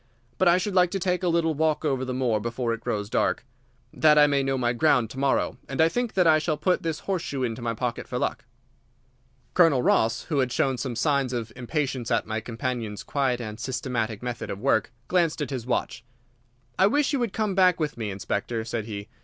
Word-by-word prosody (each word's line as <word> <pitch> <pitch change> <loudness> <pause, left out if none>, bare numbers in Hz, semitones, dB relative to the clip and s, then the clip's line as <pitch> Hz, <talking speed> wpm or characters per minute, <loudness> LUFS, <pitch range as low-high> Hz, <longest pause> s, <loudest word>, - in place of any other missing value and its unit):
But 185 - +4
I 175 +1 +6
should 190 +2 -2
like 180 -1 +4
to 195 - -2
take 180 0 0
a 180 - 0
little 165 -1 +2
walk 155 +1 0
over 135 -3 0
the 130 - -3
moor 125 -4 +1
before 115 +2 -2
it 115 - -6
grows 105 -3 -2
dark, 110 - 0 0.5
that 150 -1 +5
I 150 - +8
may 140 -1 +2
know 135 0 0
my 120 -1 +1
ground 125 -3 +2
to 130 - -7
morrow, 140 -1 +1
and 135 - -5
I 160 +1 +5
think 245 +4 -2
that 185 -2 +4
I 155 -1 +6
shall 155 -1 -1
put 180 +4 +1
this 165 -2 -3
horseshoe 165 -8 -2
into 120 0 -3
my 115 -1 -2
pocket 125 0 -3
for 125 - -3
luck." 125 - -2 1.1
Colonel 160 -8 +4
Ross, 115 +1 +2
who 150 -5 -1
had 130 -2 +1
shown 135 -1 0
some 125 -1 -3
signs 140 0 +1
of 115 -2 -4
impatience 130 -1 -2
at 115 -3 +1
my 110 0 -2
companion's 115 -2 -4
quiet 135 -4 0
and 110 -2 -6
systematic 120 -4 -3
method 120 -2 -4
of - - -4
work, 115 -2 +1 0.2
glanced 170 -4 +1
at 150 - -3
his 125 -3 -4
watch. 120 - -2 0.8
"I 190 - +6
wish 290 +6 +1
you 280 - +1
would 235 -4 -1
come 215 -1 -1
back 185 -2 +4
with 150 -2 -1
me, 110 -3 -4
Inspector," 105 +3 -3
said 115 -1 -3
he. 105 -2 -6
130 Hz, 220 wpm, -26 LUFS, 115-160 Hz, 1.1 s, I